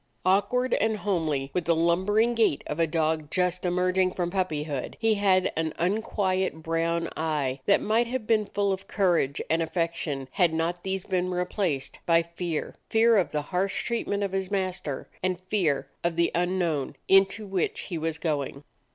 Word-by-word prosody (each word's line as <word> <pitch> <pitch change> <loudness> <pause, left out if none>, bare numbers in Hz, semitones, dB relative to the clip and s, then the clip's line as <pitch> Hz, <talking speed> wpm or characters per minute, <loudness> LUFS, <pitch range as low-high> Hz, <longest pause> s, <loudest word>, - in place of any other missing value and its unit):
Awk 195 +2 +3
ward 250 +1 +1
and 220 -1 +1
holmely, 160 -9 -1
with 180 -2 -1
the 170 - +3
lumbering 190 +8 +2
gait 225 -11 +2
of 150 - -4
a 165 - +3
dog 155 -1 0
just 180 +1 0
emerging 185 +1 +2
from 175 -1 -2
puppyhood, 155 -7 -2
he 225 -1 +3
had 195 -3 +2
an 160 -1 -1
unquiet 190 -3 0
brown 165 +1 0
eye 150 -4 -1
that 200 - +5
might 225 +3 +2
have 250 -2 -3
been 215 -2 +2
full 200 -1 0
of 190 +1 -7
courage 175 -8 +1
and 165 +1 +1
affection 165 -4 -2
had 170 -3 +2
not 170 +2 -1
these 190 0 -3
been 185 -1 -1
replaced 180 -5 -2
by 165 0 +5
fear; 170 -1 -4 0.2
fear 225 +1 +5
of 190 -4 +3
the 150 -1 -1
harsh 190 +5 -1
treat 235 -1 -2
ment 205 0 0
of 200 - -1
his 190 -1 -2
master, 185 -8 -3
and 185 -1 -1
fear 175 -9 +1 0.2
of 170 -1 0
the 170 0 +2
unknown 175 -5 0
into 195 +2 +4
which 195 -3 -1
he 175 - -5
was 160 0 -1
going. 145 -3 -2
180 Hz, 175 wpm, -27 LUFS, 160-195 Hz, 0.2 s, that